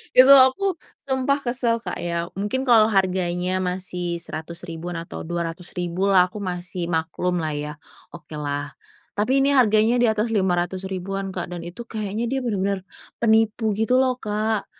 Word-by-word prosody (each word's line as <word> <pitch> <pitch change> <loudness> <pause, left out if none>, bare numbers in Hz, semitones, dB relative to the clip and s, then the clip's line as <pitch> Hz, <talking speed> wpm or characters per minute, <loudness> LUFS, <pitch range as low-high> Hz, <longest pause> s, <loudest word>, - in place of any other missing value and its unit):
Itu 260 +2 +9
aku 275 +9 +5 0.3
sumpah 265 +1 +1
kesel 240 -3 0
Kak - - -4
ya, 170 0 -2
mungkin 210 +7 -2
kalau 225 -4 +6
harganya 185 -2 0
masih 180 -1 -3
Rp100.000-an 170 +1 -6
atau 165 0 -7
Rp200.000 175 +2 -3
lah 185 -2 +6
aku 205 +3 -8
masih 180 -1 -4
maklumlah 165 0 -1
ya, 150 0 -4 0.4
okelah. 150 -3 -5 0.4
Tapi 230 +6 +1
ini 280 +1 +3
harganya 230 -1 +4
di 240 - +4
atas 220 +1 0
Rp500.000-an 190 +1 -1
Kak 180 -1 -5
dan 175 - -5
itu 175 +8 -8
kayaknya 215 0 -3
dia 265 +3 -1
bener-bener 200 -5 -1 0.4
penipu 220 0 +3
gitu 250 +4 +3
loh 255 -1 +1
Kak. 215 -1 -1
190 Hz, 140 wpm, -23 LUFS, 175-225 Hz, 0.4 s, Itu